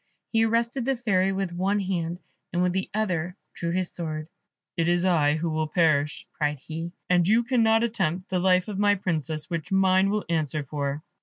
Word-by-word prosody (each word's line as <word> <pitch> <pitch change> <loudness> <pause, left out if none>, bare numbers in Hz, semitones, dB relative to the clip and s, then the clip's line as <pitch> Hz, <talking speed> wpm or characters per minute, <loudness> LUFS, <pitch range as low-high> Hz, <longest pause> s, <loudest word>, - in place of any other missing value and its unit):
He 225 0 +4
arrested 235 +3 0
the 270 0 +1
Fairy 195 -6 +1
with 190 -2 -2
one 195 +4 0
hand, 175 -3 -2 0.3
and 175 +1 +1
with 180 -1 +1
the 190 0 -2
other 180 -5 -1 0.2
drew 170 - -3
his 180 +1 -1
sword. 155 -2 -4 0.5
"It 165 0 0
is 175 +1 +2
I 160 -5 +3
who 165 +1 -2
will 155 0 -1
perish," 150 -3 +1
cried 150 -1 -1
he, 165 +5 -6
"and 175 -1 +3
you 225 +4 +4
cannot 230 -2 +3
attempt 190 -5 -1
the 185 - 0
life 180 0 +3
of 205 -2 -4
my 205 0 +4
Princess, 160 -5 -1
which 165 -2 -4
mine 190 0 +4
will 210 +1 -1
answer 155 -3 -1
for." 140 +1 -3
180 Hz, 190 wpm, -26 LUFS, 160-200 Hz, 0.5 s, He